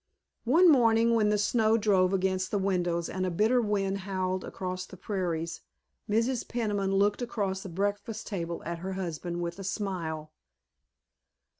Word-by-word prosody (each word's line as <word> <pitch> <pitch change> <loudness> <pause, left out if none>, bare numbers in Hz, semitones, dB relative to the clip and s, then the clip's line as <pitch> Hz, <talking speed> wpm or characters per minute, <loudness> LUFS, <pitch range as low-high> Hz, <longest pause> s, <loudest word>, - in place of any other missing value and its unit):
One 330 +10 +6
morning 230 -3 +4
when 215 -2 +3
the 210 - +2
snow 220 +1 +3
drove 195 -4 +3
against 185 -1 0
the 205 - 0
windows 175 -3 0
and 185 - -3
a 185 - +1
bitter 220 +8 +3
wind 200 -2 0
howled 185 -1 -2
across 185 0 -4
the 190 0 -12
prairies 170 -4 -3 0.5
Mrs. 230 +3 +1
Peniman 205 -5 -1
looked 205 +3 +2
across 200 -5 -2
the 190 - -7
breakfast 205 +4 -2
table 170 -5 -4
at 170 0 -4
her 190 +2 -4
husband 175 -1 -4
with 170 +2 -4
a - - -5
smile. 175 -6 -3
195 Hz, 155 wpm, -29 LUFS, 185-210 Hz, 0.5 s, One